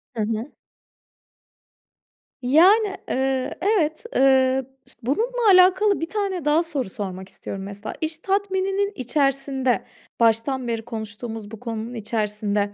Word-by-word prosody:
Hı 225 - -1
hı. 225 +5 -3 1.9
Yani, 380 - +5
eee, 265 0 0
evet, 345 -6 +1
eee, 265 0 +4 0.2
ıs - - -17
bununla 450 - +2
alakalı 375 +2 +5
1 330 - -3
tane 390 -6 -2
daha 300 +3 +3
soru 290 - -3
sormak 190 -1 -6
istiyorum. 195 -1 -7
Mesela, 205 +2 -7
iş 320 0 -1
tatmininin 390 +2 0
içerisinde, 270 0 0 0.4
baştan 235 +3 +2
beri 230 -1 -1
konuştuğumuz 220 -1 -6
bu 225 - -9
konunun 230 0 -5
içerisinde, 210 -2 -1
265 Hz, 120 wpm, -23 LUFS, 225-360 Hz, 1.9 s, Yani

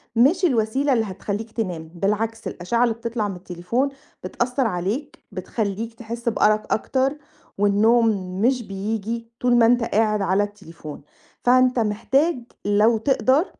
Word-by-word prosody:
مش 305 +11 +4
الوسيلة 265 0 +1
اللي 225 -2 +1
هتخليك 205 +3 -5
تنام، 180 -8 -4
بالعكس 210 +5 -1
الآشعة 230 +7 -1
اللي 235 -2 +1
بتطلع 230 -2 -3
من 195 - -5
التليفون 180 +9 -2 0.3
بتأثّر 250 +1 -1
عليك، 205 - -3
بتخليك 210 +3 -3
تحس 235 +1 -4
بأرق 215 -1 +2
أكتر، 270 +5 0 0.4
والنوم 215 +4 +4 0.3
مش 250 +1 +2
بييجي، 220 +3 -4
طول 245 -1 +3
ما 235 - +6
أنت 240 +1 +4
قاعد 215 -2 +1
على 195 +2 +2
التليفون، 170 -7 -9 0.4
فأنت 255 0 +4
محتاج 250 +8 +1 0.3
لو 210 +3 +4
تقدر 270 - +2
225 Hz, 130 wpm, -22 LUFS, 205-245 Hz, 0.4 s, ما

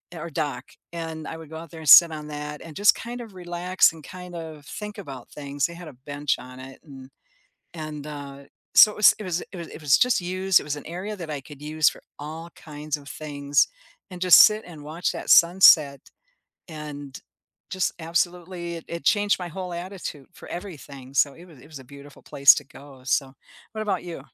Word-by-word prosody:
or 165 +1 -6
dock, 145 -5 -3 0.3
and 160 -2 -6
I - - -6
would 160 -2 -12
go 160 - -8
out 165 -1 -10
there 165 - -10
and 155 - -2
sit 170 -2 +10
on 150 -1 -7
that 150 0 -7
and 160 -3 -11
just 205 +1 +5
kind 240 +1 -7
of 225 -4 -11
relax, 180 +1 +1
and 160 - -13
kind 180 +2 -10
of 160 -3 -8
think 210 +4 -8
about 135 -9 -9
things. 140 -1 -3
They 170 - -4
had 175 -1 -10
a 145 - -13
bench 145 -1 -1
on 125 0 -11
it 130 0 -11
and, 135 -3 -13 0.7
and, 155 -2 -7
uh, 145 -2 -8 0.4
so, 215 - +9
it - - -13
was 210 - +7
it 210 - -7
was 180 -1 -2
it - - -8
was 170 -1 -7
it - - -11
was 145 -3 +5
just 250 -4 +3
used, 185 +1 +2
it - - -9
was 150 0 -3
an 145 - -9
area 185 +6 -6
that 170 -5 -7
I 145 -2 -4
could 145 +1 -14
use 155 0 +2
for - - -9 0.2
all 160 +3 -8
kinds 150 0 -5
of 140 -1 -14
things, 145 -1 0 0.4
and 180 -1 -9
just 180 -1 +8
sit 215 0 +4
and 155 -4 -11
watch 165 +4 -2
that - - -6
sunset 165 -5 +7 0.7
and, 150 -4 -8 0.5
just 185 -1 0
absolutely, 175 +1 -2
it 165 - -9
it 170 -2 -6
changed 205 +1 +2
my 180 - -5
whole 180 +1 -6
attitude 175 -5 -7
for - - -13
everything, 145 -8 -9
so, 140 0 +3
it 170 - -15
was 160 -8 -17
it - - -16
was 155 -3 -10
a - - -12
beautiful 140 +2 -14
place 140 0 +6
to 145 - -4
go. 135 -1 -15
So, 135 +1 0 0.4
what 215 - -4
about 195 -5 -2
you? 170 -6 -7
160 Hz, 215 wpm, -24 LUFS, 145-180 Hz, 0.7 s, sit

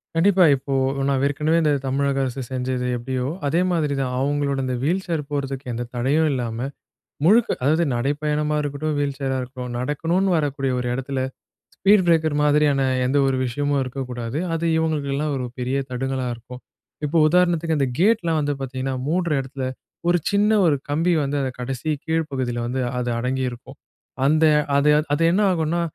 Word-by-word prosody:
கண்டிப்பா, 185 +1 +5
இப்போ 135 +1 -5 0.3
நான் 135 -1 +1
ஏற்கனவே 150 +4 +1
இந்த 150 -2 +2
தமிழக 140 +1 0
அரசு 130 +1 -3
செஞ்சது 125 -1 -2
எப்படியோ, 125 +1 -3 0.2
அதே 165 +5 +1
மாரி 155 -5 0
தான் 125 -1 -1
அவங்களோட 140 0 0
இந்த 130 -1 -1
வீல்சேர் 170 +1 0
போறதுக்கு 140 -2 -3
எந்த 120 +1 -3
தடையும் 145 +6 +2
இல்லாம, 120 -4 -2 0.7
முழுக்க 225 +6 +5
அதாவது 160 +5 +3
நடைப்பயணமா 150 +4 0
இருக்கட்டும், 145 +1 -2
வீல்சரா 140 -2 -1
இருக்கட்டும், 125 -1 -7
நடக்கணுனு 165 +8 0
வரக்கூடிய 140 -3 -1
ஒரு 125 - -2
இடத்துல 130 0 -2 0.5
ஸ்பீட் 200 -1 +4
பிரேக்கர் 160 -3 +3
மாதிரியான 145 -1 +3 0.2
எந்த 130 +3 +1
ஒரு 135 - +1
விஷயமும் 145 +3 0
இருக்கக்கூடாது. 125 -1 -5 0.2
அது 165 0 -1
இவங்களுக்கெல்லாம் 150 -2 -1
ஒரு 130 -1 -2
பெரிய 125 +2 -1
தடுங்களா 130 +1 -2
இருக்கும். 125 +2 -11 0.4
இப்போ 155 +3 0
உதாரணத்துக்கு 170 -1 +2
அந்த 135 - +2
கேட்லாம் 180 -6 +3
வந்து 145 0 0
பாத்தீங்கன்னா, 130 0 -3
மூடுற 175 0 0
இடத்துல 135 0 -5 0.4
ஒரு 175 - +4
சின்ன, 205 +1 +3 0.2
ஒரு 150 - +3
கம்பி 165 +5 +2
வந்து 140 +1 -1
அத 130 - 0
கடைசி 130 +3 -4 0.2
கீழ்ப் 160 -1 -1
பகுதியில 120 -2 -2
வந்து 130 +2 -2 0.2
அது 120 -1 -1
அடங்கியிருக்கும். 130 +1 -3 0.5
அந்த 155 +2 +4 0.3
அது 145 +1 +3 0.2
அது 155 +3 +1
என்ன 205 - +2
ஆகும்னா, 165 0 0
140 Hz, 155 wpm, -22 LUFS, 130-160 Hz, 0.7 s, கண்டிப்பா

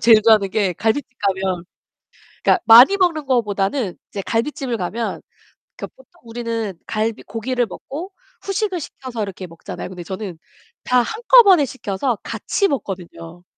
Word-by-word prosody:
제일 220 -2 +6
좋아하는 215 -3 +4
게 195 -3 +1
갈빗집 225 - -1
가면 190 -3 -1 0.8
그러니까 360 - +3
많이 245 - +9
먹는 335 -6 +1
거보다는 210 -3 0
이제 200 - -5
갈빗집을 240 +2 -2
가면 220 +5 -4 0.6
그 - - -6
보통 - - -24
우리는 230 -4 -4
갈비 220 +1 -2
고기를 240 +3 -2
먹고 320 - -8 0.3
후식을 390 -2 -1
시켜서 255 -6 -7
이렇게 190 -2 -7
먹잖아요. 165 +2 -8
근데 180 -2 -8
저는 190 0 -6 0.5
다 250 -1 +3
한꺼번에 435 - +5
시켜서 235 -1 -3
같이 400 - -1
먹거든요. 175 - -6
230 Hz, 335 characters per minute, -20 LUFS, 195-280 Hz, 0.8 s, 많이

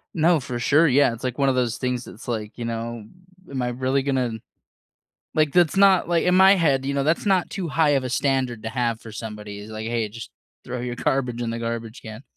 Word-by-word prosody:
No, 165 0 +4
for 125 -1 -5
sure 150 +6 +4
Yeah, 140 -2 +4
it's 115 - -10
like 125 0 -3
one 135 -1 +3
of 130 - +1
those 120 -2 0
things 125 -1 -2
that's 115 - -12
like, 110 -3 -3
you 120 - -4
know, 115 -1 -4 0.5
am 135 -2 -3
I 125 - -1
really 130 +2 0
gonna 130 -4 0 1.0
like 155 -2 +2
that's 175 0 +3
not 195 -3 +5
like 170 -1 +2
in 180 - +3
my 190 +1 +7
head, 140 -7 +1
you 140 - -1
know, 140 -1 0
that's 165 +6 +1
not 190 -3 +2
too 180 -4 -4
high 155 -1 +2
of 135 -2 +2
a - - -2
standard 130 -4 0
to 115 - -3
have 115 -2 -1
for 110 - -11
somebody 105 -2 -7
is 105 +2 -10
like, 110 0 -6
"Hey, 115 -2 -1
just 115 +1 -9 0.3
throw 125 0 -5
your 125 0 -4
garbage 125 -2 -1
in 115 - -2
the 115 - -4
garbage 115 0 -5
can." 110 +2 -9
125 Hz, 240 wpm, -23 LUFS, 115-145 Hz, 1.0 s, my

